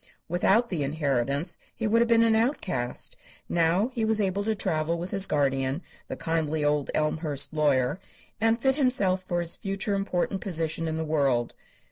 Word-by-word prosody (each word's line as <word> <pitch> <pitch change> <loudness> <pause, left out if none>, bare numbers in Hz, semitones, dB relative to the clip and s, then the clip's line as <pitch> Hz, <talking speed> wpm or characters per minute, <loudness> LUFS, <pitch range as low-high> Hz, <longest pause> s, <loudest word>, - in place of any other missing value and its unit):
Without 195 +7 +2
the 170 -5 -1
inheritance 140 0 -1 0.2
he 230 - -3
would 225 +2 +3
have 235 - +3
been 230 0 +5
an 225 -1 +4
outcast; 195 - -1 0.3
now 175 +7 +2
he 245 -4 -3
was 220 0 +2
able 200 0 0
to 220 0 +1
travel 160 -3 -1
with 175 +2 -5
his 195 -1 +2
guardian, 135 +1 0 0.2
the - - -4
kindly 160 -2 -1
old 145 -1 +1
Elmhurst 155 -1 0
lawyer, 145 0 +2 0.4
and 225 +1 +3
fit 265 +2 +2
himself 250 -10 +2
for 175 -1 -2
his 170 0 -3
future 195 +1 -3
important 195 -1 -1
position 165 -3 -1
in 160 0 -2
the 160 - -2
world. 135 -6 +1
170 Hz, 170 wpm, -27 LUFS, 150-210 Hz, 0.4 s, been